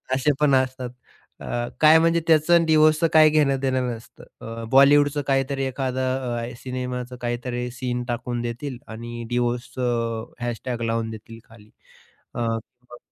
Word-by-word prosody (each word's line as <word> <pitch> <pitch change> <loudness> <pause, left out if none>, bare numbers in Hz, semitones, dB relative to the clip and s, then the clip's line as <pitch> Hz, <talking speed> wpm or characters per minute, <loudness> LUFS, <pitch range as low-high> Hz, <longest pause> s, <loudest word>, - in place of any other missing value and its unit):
असे 135 +3 +2
पण 150 -2 +3
असतात. 130 -1 -1 0.5
अ, - - -8 0.4
काय 155 +1 +8
म्हणजे 165 +1 +3
त्याच 155 0 +3
आणि 170 -1 +6
डिवोर्सचं 155 0 +4
काही 155 -1 +7
घेणं-देणं 135 -4 +1
नसतं. 115 -1 -9 0.2
अ, 115 0 -7
बॉलिवूडचं 145 +2 +5
काहीतरी 135 0 0
एखादा 130 0 -2
अ, 125 -3 -3
अ, - - -10
सिनेमाचं 125 0 -5
काहीतरी 120 0 -3
सीन 125 -1 -3
टाकून 120 0 -3
देतील. 120 +3 -5
आणि 120 +1 -7
डिवोर्सचं 120 -1 -2
# 120 0 -4
लावून 115 0 -1
देतील 115 +1 -10
खाली. 110 -2 -18 0.6
अ, - - -5
मग 120 +2 -5
125 Hz, 140 wpm, -23 LUFS, 120-140 Hz, 0.6 s, काय